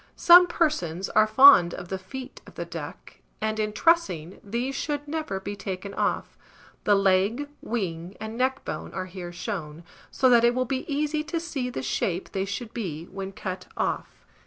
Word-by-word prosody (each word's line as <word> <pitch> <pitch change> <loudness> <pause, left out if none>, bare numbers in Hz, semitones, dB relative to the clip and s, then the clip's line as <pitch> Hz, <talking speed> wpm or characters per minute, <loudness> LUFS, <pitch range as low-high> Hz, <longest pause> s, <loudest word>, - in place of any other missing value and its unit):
Some 355 +1 +8
persons 195 - -1
are 215 0 +4
fond 215 -7 +7
of 175 - -8
the 190 - -3
feet 255 +7 -9
of - - -14
the - - -4
duck; - - -9 0.2
and, 220 0 -2
in 215 0 0
trussing, 210 - +1
these 235 +6 -2
should 290 +1 -3
never 305 -10 -3
be 200 +1 -5
taken 195 0 -6
off. - - -1 0.5
The 205 - +5
leg, 195 +8 +2
wing, 185 -5 -4
and 220 +1 -6
neckbone 260 +2 -2
are 185 - -3
here 180 -1 -8
shown; 175 -4 -5 0.3
so 260 - +2
that 235 -1 +6
it 240 +1 +4
will 255 0 +1
be 265 +4 -3
easy 300 +1 0
to 335 +1 -2
see 290 -7 -3
the 130 - -5
shape 180 +5 -2
they 190 -1 -1
should 215 +4 -5
be 170 -8 -4
when 195 0 -5
cut 185 -1 -6
off. - - -3
215 Hz, 180 wpm, -26 LUFS, 185-265 Hz, 0.5 s, Some